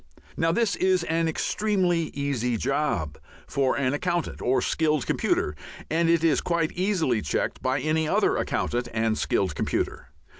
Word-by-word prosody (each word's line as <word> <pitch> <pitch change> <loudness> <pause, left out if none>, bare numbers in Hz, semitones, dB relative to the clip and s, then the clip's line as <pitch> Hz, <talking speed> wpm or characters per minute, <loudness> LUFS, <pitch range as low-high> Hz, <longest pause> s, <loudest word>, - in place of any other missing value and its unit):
Now 165 0 +2
this 225 +3 +1
is 185 -2 +2
an 165 0 0
extremely 180 0 0
easy 125 -4 -1
job 110 - -1 0.3
for 135 -2 0
an 130 -1 +1
accountant 170 +3 -2
or 130 +2 +2
skilled 155 -4 +1
computer, 75 - 0 0.4
and 165 +1 +2
it 165 -1 +3
is 165 -2 +3
quite 170 -2 0
easily 175 - 0
checked 75 - -2
by 130 +2 0
any 155 +3 0
other - - +2
accountant 120 0 -1
and 110 0 +1
skilled 95 -5 0
computer. - - -2
155 Hz, 150 wpm, -26 LUFS, 125-170 Hz, 0.4 s, it